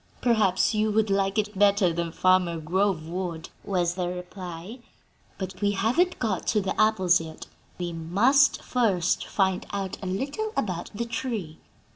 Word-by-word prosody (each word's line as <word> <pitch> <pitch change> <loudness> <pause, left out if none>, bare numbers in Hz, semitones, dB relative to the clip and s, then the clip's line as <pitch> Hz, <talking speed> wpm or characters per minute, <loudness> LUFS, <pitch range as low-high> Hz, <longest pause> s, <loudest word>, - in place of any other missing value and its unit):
"Perhaps 215 -5 +2
you 215 0 +1
would 215 -1 +1
like 195 +1 +1
it 210 -1 -1
better 200 -4 +4
than 170 0 -2
Farmer 185 -1 +2
Grove 175 0 0
would," 170 -2 -4
was 175 -3 0
the 180 -1 -2
reply. 180 +3 -7 0.6
"But 190 -1 -6
we 205 0 +2
haven't 250 - +1
got 210 -7 -2
to 215 - +2
the 195 +1 -1
apples 190 -5 +4
yet; 160 -1 -9 0.3
we 175 -1 -4
must 210 - +3
first 200 -8 +1
find 190 -2 +1
out 195 -2 -4
a 190 - -5
little 285 - -3
about 180 -5 -2
the 235 +3 -2
tree. 225 -10 -4
190 Hz, 155 wpm, -26 LUFS, 175-215 Hz, 0.6 s, better